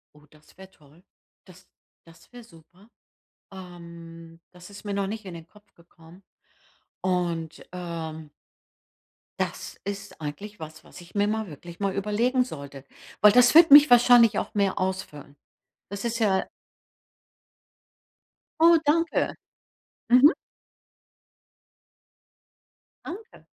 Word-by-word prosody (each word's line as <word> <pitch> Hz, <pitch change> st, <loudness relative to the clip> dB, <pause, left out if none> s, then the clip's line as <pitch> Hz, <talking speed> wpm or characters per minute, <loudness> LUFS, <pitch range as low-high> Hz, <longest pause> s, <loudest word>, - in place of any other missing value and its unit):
Oh, 150 Hz, 0 st, -21 dB
das 155 Hz, +3 st, -24 dB
wäre 190 Hz, 0 st, -14 dB
toll. 150 Hz, +4 st, -24 dB, 0.4 s
Das 180 Hz, 0 st, -19 dB, 0.4 s
das 165 Hz, +3 st, -21 dB
wäre 245 Hz, -1 st, -13 dB
super. 185 Hz, +2 st, -21 dB, 0.6 s
Ähm, 170 Hz, -2 st, -13 dB
das 180 Hz, +1 st, -15 dB
ist 200 Hz, 0 st, -13 dB
mir 205 Hz, -1 st, -5 dB
noch 200 Hz, -1 st, -2 dB
nicht 215 Hz, +1 st, -7 dB
in 185 Hz, -, -8 dB
den 165 Hz, -1 st, -11 dB
Kopf 210 Hz, +3 st, -24 dB
gekommen. 170 Hz, +2 st, -20 dB, 0.8 s
Und, 170 Hz, -3 st, -3 dB
ähm 160 Hz, -3 st, -7 dB, 1.1 s
das -, -, -5 dB
ist 200 Hz, 0 st, -8 dB
eigentlich 185 Hz, +7 st, -8 dB
was, 155 Hz, 0 st, -11 dB
was -, -, -15 dB
ich 175 Hz, 0 st, -16 dB
mir 205 Hz, 0 st, +1 dB
mal 220 Hz, 0 st, -3 dB
wirklich 170 Hz, +2 st, -12 dB
mal 200 Hz, -1 st, -2 dB
überlegen 225 Hz, +6 st, 0 dB
sollte, 140 Hz, -, -10 dB, 0.4 s
weil 210 Hz, 0 st, +7 dB
das 245 Hz, +2 st, +5 dB
wird 330 Hz, +1 st, +7 dB
mich 290 Hz, +1 st, +9 dB
wahrscheinlich 240 Hz, -3 st, +5 dB
auch -, -, -6 dB
mehr 200 Hz, -2 st, 0 dB
ausfüllen. 185 Hz, -7 st, -5 dB, 0.6 s
Das 200 Hz, +1 st, -7 dB
ist 235 Hz, 0 st, -2 dB
ja 195 Hz, -4 st, +1 dB, 2.2 s
Oh, 335 Hz, 0 st, +6 dB
danke. 330 Hz, +2 st, +1 dB, 0.8 s
Mhm. 255 Hz, +7 st, +6 dB, 2.7 s
Danke. 425 Hz, +5 st, -11 dB
190 Hz, 120 wpm, -25 LUFS, 165-215 Hz, 2.7 s, mich